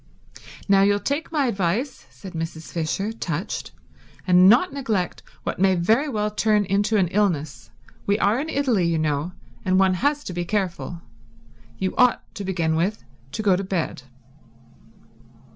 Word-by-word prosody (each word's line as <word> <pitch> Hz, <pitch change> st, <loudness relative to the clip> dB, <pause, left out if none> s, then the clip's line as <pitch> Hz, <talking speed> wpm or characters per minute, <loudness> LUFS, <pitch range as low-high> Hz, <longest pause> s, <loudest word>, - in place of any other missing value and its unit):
"Now 195 Hz, -1 st, +5 dB
you'll 205 Hz, +1 st, +3 dB
take 285 Hz, +11 st, -2 dB
my 295 Hz, -4 st, +1 dB
advice," 220 Hz, +4 st, -1 dB
said 190 Hz, -2 st, -11 dB
Mrs. 165 Hz, -1 st, -5 dB
Fisher, 180 Hz, +6 st, -2 dB
touched, 175 Hz, -4 st, -4 dB, 0.5 s
"and 180 Hz, 0 st, +6 dB
not 270 Hz, -, +4 dB
neglect 220 Hz, -10 st, -2 dB, 0.2 s
what -, -, -3 dB
may 190 Hz, 0 st, +4 dB
very 225 Hz, -, +2 dB
well 210 Hz, -4 st, -1 dB
turn 210 Hz, -1 st, +2 dB
into 205 Hz, +3 st, +1 dB
an 190 Hz, -3 st, +3 dB
illness. 155 Hz, -10 st, -1 dB, 0.4 s
We 200 Hz, 0 st, +3 dB
are 220 Hz, +3 st, +2 dB
in 310 Hz, +3 st, -3 dB
Italy, 255 Hz, -, +1 dB
you 165 Hz, -1 st, +1 dB
know, 155 Hz, +2 st, -1 dB, 0.3 s
and 185 Hz, -1 st, +2 dB
one 190 Hz, -1 st, +4 dB
has 285 Hz, +9 st, 0 dB
to 185 Hz, -, -6 dB
be 175 Hz, 0 st, -2 dB
careful. 175 Hz, -3 st, -3 dB, 0.7 s
You 190 Hz, -1 st, -2 dB
ought, 250 Hz, -1 st, +4 dB
to 205 Hz, -, -6 dB
begin 170 Hz, -4 st, 0 dB
with, 190 Hz, +7 st, -1 dB, 0.3 s
to 215 Hz, -, -3 dB
go 195 Hz, -3 st, +4 dB
to 195 Hz, -, -2 dB
bed." 185 Hz, -7 st, -2 dB
195 Hz, 160 wpm, -23 LUFS, 175-220 Hz, 0.7 s, and